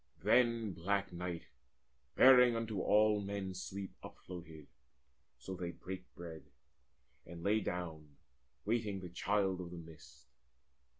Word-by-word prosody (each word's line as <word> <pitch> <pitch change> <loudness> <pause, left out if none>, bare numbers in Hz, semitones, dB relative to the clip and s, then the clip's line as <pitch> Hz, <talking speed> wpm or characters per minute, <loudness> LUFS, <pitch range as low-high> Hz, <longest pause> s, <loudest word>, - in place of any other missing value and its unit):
Then 115 -4 +3
black 100 +3 -1
night, 85 -1 -4 0.7
bearing 125 -2 +8
unto 115 -3 -2
all 105 0 +4
men 100 -1 -3
sleep, 95 +1 -6
Upfloated: 80 -4 -9 0.7
so 80 +10 -7
they 90 -1 -4
brake 95 0 -8
bread, 85 -2 -8 0.8
and 85 0 -10
lay 105 +3 +3
down 80 -7 -5 0.5
Waiting 105 -3 0
the 90 - -7
Child 95 +1 0
of 90 - -6
the 90 - -8
Mist. 80 -2 -13
95 Hz, 120 wpm, -36 LUFS, 85-105 Hz, 0.8 s, bearing